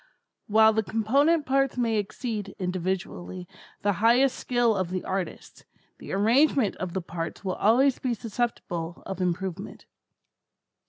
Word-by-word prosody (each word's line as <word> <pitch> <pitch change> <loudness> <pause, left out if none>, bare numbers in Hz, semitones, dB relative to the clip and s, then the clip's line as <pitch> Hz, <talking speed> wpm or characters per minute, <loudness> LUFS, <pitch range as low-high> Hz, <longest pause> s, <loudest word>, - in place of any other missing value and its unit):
While 220 +1 +5
the 220 - +2
component 275 +10 +2
parts 270 -1 +1
may 230 -3 +1
exceed, 210 0 -4
individually, 185 0 -4 0.4
the 205 0 +2
highest 250 +4 +4
skill 240 -3 +1
of 185 -3 -1
the 185 0 -3
artist, 190 -1 -5 0.4
the - - -9
arrangement 230 +3 +3
of 180 -2 -4
the 190 - -3
parts 165 +2 -6
will 185 - 0
always 250 +8 +3
be 250 -2 -1
susceptible 200 -7 -4
of 190 -1 -5
improvement. 180 0 -3
210 Hz, 130 wpm, -26 LUFS, 185-245 Hz, 0.4 s, While